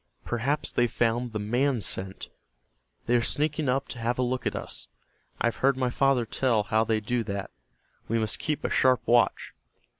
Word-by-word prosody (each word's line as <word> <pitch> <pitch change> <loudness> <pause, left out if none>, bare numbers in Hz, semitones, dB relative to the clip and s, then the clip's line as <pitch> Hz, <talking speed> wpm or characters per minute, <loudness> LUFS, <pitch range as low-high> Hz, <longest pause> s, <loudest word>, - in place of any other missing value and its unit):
Perhaps 135 +6 -1
they 120 - +2
found 120 +1 0
the 110 - -3
man 120 +5 +1
scent. 95 -2 -3 0.8
They 120 - +2
are 120 - +4
sneaking 150 +3 0
up 135 +2 0
to 120 - -7
have 120 +2 -1
a 130 - +1
look 125 +1 -1
at - - -2
us. - - -5 0.5
I - - 0
have 115 -2 0
heard 135 0 +2
my 130 -2 0
father 135 -2 +2
tell 115 -2 +1
how 110 +2 +2
they 110 -1 +1
do 120 +3 -1
that. 100 -1 -4 0.6
We 115 - 0
must 110 -2 -1
keep 150 -2 -2
a - - 0
sharp 130 -3 +3
watch." 120 -1 +2
120 Hz, 190 wpm, -27 LUFS, 110-130 Hz, 0.8 s, are